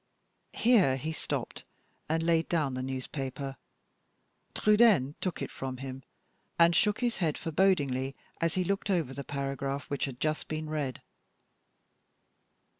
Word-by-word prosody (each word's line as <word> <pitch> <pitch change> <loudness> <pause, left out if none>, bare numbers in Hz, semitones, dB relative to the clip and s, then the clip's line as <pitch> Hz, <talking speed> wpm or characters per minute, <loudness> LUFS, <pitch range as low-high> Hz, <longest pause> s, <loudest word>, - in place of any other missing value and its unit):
Here 215 - +5
he 155 +4 -3
stopped 160 - -4 0.5
and 160 +1 +1
laid 165 -1 +2
down 155 -6 +1
the 130 - -3
newspaper. 135 +1 -4 1.0
Trudaine 210 - +5
took 185 - -2
it - - -5
from 130 -1 -5
him, 135 0 -6 0.6
and 170 0 +6
shook 210 +3 +2
his 240 -2 0
head 160 -5 0
forebodingly 145 -7 +1 0.3
as 165 -1 +1
he 185 - +2
looked 200 +2 -1
over 165 -9 +1
the 140 - -5
paragraph 140 0 -3
which 140 - 0
had 130 -3 -7
just 155 0 -1
been 155 0 -3
read. 140 -5 -3
155 Hz, 135 wpm, -30 LUFS, 135-175 Hz, 1.0 s, and